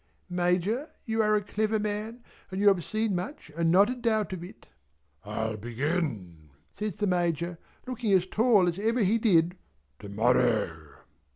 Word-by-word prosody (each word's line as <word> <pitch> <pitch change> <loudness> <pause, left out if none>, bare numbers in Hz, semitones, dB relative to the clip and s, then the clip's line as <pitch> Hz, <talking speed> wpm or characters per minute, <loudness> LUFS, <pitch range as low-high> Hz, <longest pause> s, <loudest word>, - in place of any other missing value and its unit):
"Major 180 - 0 0.2
you 225 -1 0
are 215 0 +3
a 210 - 0
clever 215 +2 0
man 215 +3 -4 0.3
and 190 - -4
you 205 0 +6
have 185 -4 +1
seen 215 +2 -1
much 180 - -6
and 165 0 +1
not 190 +4 +6
a 250 - -1
doubt 220 -5 0
of 175 -2 -6
it." 180 - -12 0.6
"I'll 110 +1 -3
begin," 115 - -3 0.2
says 210 -4 -4
the 210 - -1
Major 175 -2 0 0.3
looking 245 -4 -2
as 185 -1 +4
tall 210 -2 +3
as 175 +2 -1
ever 225 +3 +1
he 215 +4 +2
did, 180 -5 +3 0.4
"to 100 - -9
morrow." 105 - +1
185 Hz, 165 wpm, -28 LUFS, 155-215 Hz, 0.6 s, you